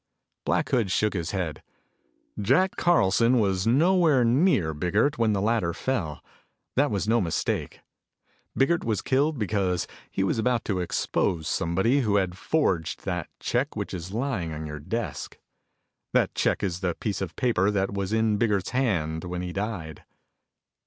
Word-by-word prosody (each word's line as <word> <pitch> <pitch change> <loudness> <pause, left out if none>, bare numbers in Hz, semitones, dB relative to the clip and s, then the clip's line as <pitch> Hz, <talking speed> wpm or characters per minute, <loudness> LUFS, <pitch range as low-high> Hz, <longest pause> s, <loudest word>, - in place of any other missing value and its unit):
Black - - +1
Hood 115 -6 +1
shook 105 +3 +1
his 85 -4 -3
head, 85 -6 -3 0.8
"Jack 135 - +2
Carlson 120 - +3
was 95 -2 +1
nowhere 155 0 +4
near 115 - +3
Biggert 105 - +1
when 110 -2 +3
the 100 - 0
latter 110 -6 +1
fell. 95 - -2 0.5
That 145 +3 +3
was 100 -2 -2
no 115 +1 +3
mistake. 85 -3 -2 0.8
Biggert 165 +5 +2
was 110 -4 -1
killed 145 +3 +1
because 95 -5 0 0.2
he 95 - -1
was 95 - 0
about 120 0 +1
to 95 -4 -1
expose 85 -2 -1
somebody 95 +14 +1
who 105 -5 +1
had 95 -3 +1
forged 95 - -1
that 90 -4 -3
check 125 +5 -1
which 100 -2 -4
is 90 -1 -5
lying 110 - -2
on 80 0 -5
your 75 -1 -6
desk. 115 +11 -4 0.8
That - - +2
check - - 0
is 90 -2 -1
the 90 -3 -1
piece 105 -3 -3
of 90 -3 -4
paper 115 -7 +2
that 100 -1 0
was 100 0 -2
in 110 -1 +2
Biggert's 105 -4 0
hand 85 -12 0
when 90 0 -4
he 90 0 -5
died." 100 -7 -4
100 Hz, 160 wpm, -26 LUFS, 90-120 Hz, 0.8 s, nowhere